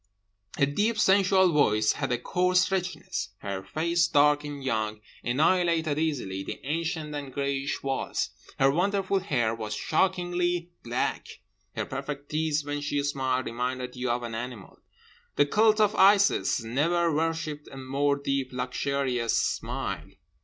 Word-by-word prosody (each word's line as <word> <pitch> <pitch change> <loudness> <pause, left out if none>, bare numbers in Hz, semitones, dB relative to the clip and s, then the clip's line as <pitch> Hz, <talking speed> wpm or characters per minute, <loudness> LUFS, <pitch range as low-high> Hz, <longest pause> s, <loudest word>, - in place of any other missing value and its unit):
Her 140 - +4
deep 210 +11 0
sensual 190 -2 +4
voice 110 -7 +3
had - - -3
a 125 - +2
coarse 180 +8 +2
richness. 190 -2 -3
Her 100 -1 -4
face, 170 - +1
dark 150 -1 +4
and 145 -2 -6
young, 110 -4 -1 0.2
annihilated 160 +3 +2
easily 125 -12 -2
the - - -6
ancient 160 0 -2
and 145 -2 -5
greyish 140 0 -2
walls. 135 -1 -2 0.3
Her 135 0 +4
wonderful 195 +4 +1
hair 130 - 0
was 110 -2 -4
shockingly 175 -2 0
black. 120 +1 -3 0.3
Her - - -2
perfect 140 +1 -6
teeth, 155 -1 0
when 145 0 -3
she 145 0 -1
smiled, 130 -2 -1
reminded 125 +1 -3
you 125 0 -2
of 120 +1 0
an 115 -1 -5
animal. 115 -3 -7 0.6
The 145 - +4
cult 215 +7 +3
of 210 -1 +4
Isis 200 - +4
never 165 +8 +1
worshipped 160 -2 -2
a 135 - -9
more 140 +2 0
deep 140 -2 -2
luxurious 125 -1 -1
smile. - - -2
145 Hz, 140 wpm, -27 LUFS, 130-170 Hz, 0.6 s, Her